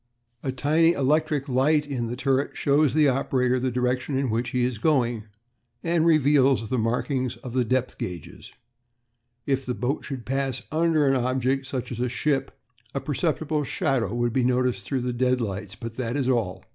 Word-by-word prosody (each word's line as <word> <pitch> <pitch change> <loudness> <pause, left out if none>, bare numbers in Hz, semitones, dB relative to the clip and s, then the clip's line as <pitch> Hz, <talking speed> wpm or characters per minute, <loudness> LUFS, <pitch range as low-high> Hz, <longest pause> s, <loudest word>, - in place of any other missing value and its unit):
A 130 - -2
tiny 155 +5 +3
electric 150 0 +1
light 145 +4 +2
in 130 -5 -3
the 120 - -4
turret 135 +1 0
shows 145 0 +2
the 155 -2 +5
operator 130 -1 +1
the 130 +1 0
direction 125 +2 -1
in 135 -3 0
which 115 +2 -1
he 125 -1 +1
is 125 -4 -3
going, 120 -6 +1 0.6
and 165 -1 +2
reveals 140 -6 +3
the 130 - 0
markings 125 +3 -1
on 125 - -7
the 125 -1 +2
depth 130 +2 -1
gauges. 90 -4 -7 0.9
If 135 -1 0
the 125 -1 -3
boat 130 +4 -2
should 135 -5 -6
pass 135 -1 -2
under 160 -1 +2
an 135 - +4
object, 130 +1 0
such 125 -2 -4
as 120 - -5
a 125 0 0
ship, 135 +2 -1 0.4
a - - +1
perceptible 150 +2 -1
shadow 135 - -1
would 120 -1 0
be 130 - +2
noticed 125 0 +1
through 135 -3 -1
the 125 0 -2
deadlights, 115 -6 -1
but 115 +3 -8
that 125 0 -2
is 135 -3 0
all. 115 -8 -1
130 Hz, 180 wpm, -25 LUFS, 125-140 Hz, 0.9 s, the